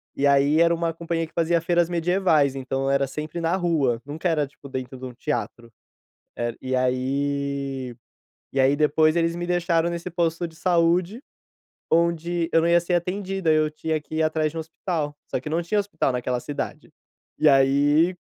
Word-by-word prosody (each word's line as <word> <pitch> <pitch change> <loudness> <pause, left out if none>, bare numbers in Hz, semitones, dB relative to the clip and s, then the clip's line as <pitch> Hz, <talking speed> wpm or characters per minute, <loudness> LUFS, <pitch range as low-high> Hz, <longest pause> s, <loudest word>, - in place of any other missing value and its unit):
E 140 - 0
aí 140 +3 +4
era 170 0 +4
uma 165 0 -1
companhia, 165 -1 -3
que - - -26
fazia 170 0 +1
feiras 175 0 +2
medievais, 170 -5 +2
então, 135 +1 -2
era 140 0 +2
sempre 155 +5 -5
na 165 +2 +1
rua, 150 -10 +1
nunca 155 +5 -3
era 150 -3 +1
tipo, 140 0 -14
dentro 130 0 -5
de 130 - -8
um 125 - -7
teatro. 120 -3 -4 0.7
Eh, 120 -1 -2
e 130 0 -1
aí 135 0 -1 0.6
e 135 - -2
aí 135 +2 +4
depois 155 +2 +3
eles 165 0 +1
me 175 0 -4
deixaram, 175 -1 +1
nesse 170 +1 -4
posto 170 0 -1
de 160 - -16
saúde, 175 - +1 0.7
onde 170 0 +1
eu 165 - +5
não 170 - +2
ia 170 0 +5
ser 175 +1 -2
atendido, 185 +1 -2
eu 155 -1 +3
tinha 155 +1 -2
que 155 +1 -8
ir 160 - +2
atrás 155 -1 0
de 165 - -12
um - - -1
hospital, 160 -2 -4
só - - -1
que 140 - -7
não 165 +3 0
tinha 210 +5 0
hospital 200 -8 0
naquela 125 0 -2
cidade. 145 +2 -6 0.5
E 155 - +5
aí 145 +5 +4
160 Hz, 185 wpm, -24 LUFS, 140-170 Hz, 0.7 s, eu